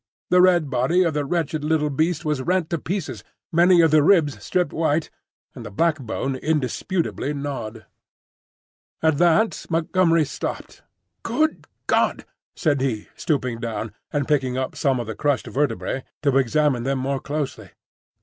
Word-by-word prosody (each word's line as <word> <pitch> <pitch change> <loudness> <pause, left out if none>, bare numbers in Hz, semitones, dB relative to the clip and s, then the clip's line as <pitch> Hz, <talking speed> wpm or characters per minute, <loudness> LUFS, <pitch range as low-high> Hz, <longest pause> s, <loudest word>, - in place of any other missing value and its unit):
The 180 0 +6
red 175 -6 +4
body 130 +9 +2
of 165 -3 0
the 145 -1 -1
wretched 160 -1 -1
little 150 -1 +1
beast 160 +4 0
was 150 -3 0
rent 180 +2 0
to 170 - 0
pieces, 190 +5 -4 0.3
many 175 +1 +5
of 165 -2 +4
the 155 -1 +6
ribs 155 -3 +3
stripped 180 -5 0
white, 160 -1 0 0.4
and 125 - -9
the 105 - -7
backbone 135 0 -1
indisputably 150 +2 -1
gnawed. 120 -6 -5 1.2
At 160 -3 +3
that 175 +6 +3
Montgomery 165 0 +2
stopped. 140 - -6 0.4
"Good 315 0 -1 0.2
God!" - - +1 0.3
said 145 -5 +1
he, 115 -6 -2
stooping 125 -6 -1
down, 115 -2 -4 0.2
and 145 -2 -1
picking 130 -4 +1
up 130 0 -3
some 135 -5 +1
of 120 - -3
the 110 - -5
crushed 145 +3 0
vertebrae 135 -1 -2 0.2
to 140 -3 +2
examine 135 0 +2
them 135 +2 -1
more 135 +1 -1
closely. 145 0 -4
150 Hz, 150 wpm, -23 LUFS, 130-165 Hz, 1.2 s, The